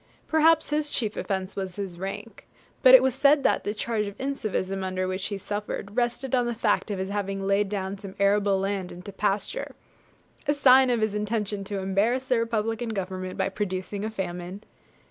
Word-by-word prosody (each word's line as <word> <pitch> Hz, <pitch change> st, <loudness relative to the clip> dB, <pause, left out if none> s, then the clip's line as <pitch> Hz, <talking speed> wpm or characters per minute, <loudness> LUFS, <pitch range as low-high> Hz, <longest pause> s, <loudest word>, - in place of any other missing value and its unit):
Perhaps 320 Hz, 0 st, +4 dB
his 300 Hz, 0 st, +1 dB
chief 220 Hz, -7 st, -1 dB
offence 190 Hz, -1 st, -3 dB
was 190 Hz, -2 st, -4 dB
his 190 Hz, -4 st, -5 dB
rank; 200 Hz, +4 st, -7 dB, 0.3 s
but -, -, +9 dB
it -, -, +7 dB
was 265 Hz, -, +2 dB
said 285 Hz, +2 st, +4 dB
that -, -, +2 dB
the 205 Hz, -, -1 dB
charge 215 Hz, 0 st, -2 dB
of 200 Hz, -, -8 dB
'incivism,' 215 Hz, -8 st, -2 dB
under 185 Hz, 0 st, -2 dB
which 185 Hz, +1 st, -2 dB
he 205 Hz, -, -3 dB
suffered, 205 Hz, +1 st, -5 dB
rested 245 Hz, +2 st, -1 dB
on 245 Hz, -2 st, +3 dB
the 240 Hz, -, -2 dB
fact 220 Hz, -1 st, +1 dB
of 205 Hz, -, -2 dB
his 190 Hz, +1 st, -3 dB
having 195 Hz, -1 st, -2 dB
laid 200 Hz, +1 st, +2 dB
down 195 Hz, -1 st, -3 dB
some 195 Hz, -2 st, -9 dB
arable 200 Hz, 0 st, +3 dB
land 195 Hz, -1 st, -2 dB
into 180 Hz, +3 st, -9 dB
pasture 205 Hz, -, -1 dB, 0.7 s
a 290 Hz, -, +4 dB
sure -, -, -16 dB
sign 260 Hz, -1 st, +7 dB
of 240 Hz, -2 st, +1 dB
his 215 Hz, -1 st, +1 dB
intention 210 Hz, -1 st, -2 dB
to 205 Hz, 0 st, -4 dB
embarrass 200 Hz, +7 st, +1 dB
the 255 Hz, -2 st, +2 dB
Republican 225 Hz, 0 st, -1 dB
Government 185 Hz, -3 st, -4 dB
by -, -, +1 dB
producing 195 Hz, 0 st, -3 dB
a 215 Hz, -, -1 dB
famine! 185 Hz, -1 st, -5 dB
205 Hz, 195 wpm, -26 LUFS, 195-235 Hz, 0.7 s, but